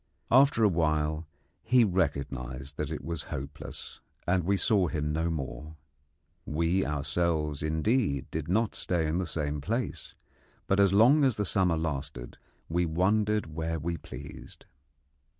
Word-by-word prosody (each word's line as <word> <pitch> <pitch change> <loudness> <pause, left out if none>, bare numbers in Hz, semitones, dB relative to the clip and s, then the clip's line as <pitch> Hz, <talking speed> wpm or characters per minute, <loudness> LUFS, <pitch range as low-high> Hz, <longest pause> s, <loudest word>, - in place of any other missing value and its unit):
After 130 -2 +5
a - - +7
while 80 -3 0 0.3
he 125 -1 +4
recognised 70 - -2
that 75 - -2
it 80 - -5
was 85 -2 -3
hopeless, 70 +2 -7 0.3
and 90 0 +2
we 100 +2 +2
saw 95 -2 +2
him 75 -1 -2
no 80 +2 0
more. 75 0 -5 0.7
We 85 +5 +1
ourselves, 75 +1 0
indeed, 80 - +1
did 80 -1 -3
not 105 +4 +1
stay 85 -3 0
in 80 +3 0
the 90 - -2
same 75 -3 -2
place, 115 - -3 0.5
but 95 - +1
as 100 -2 +5
long 125 +9 +6
as 130 -5 +3
the 105 - -1
summer 90 -4 +2
lasted 70 -6 -4 0.3
we 85 +2 +1
wandered 100 +2 +1
where 80 +1 -2
we 85 +2 -2
pleased. - - -10
80 Hz, 145 wpm, -29 LUFS, 75-95 Hz, 0.7 s, a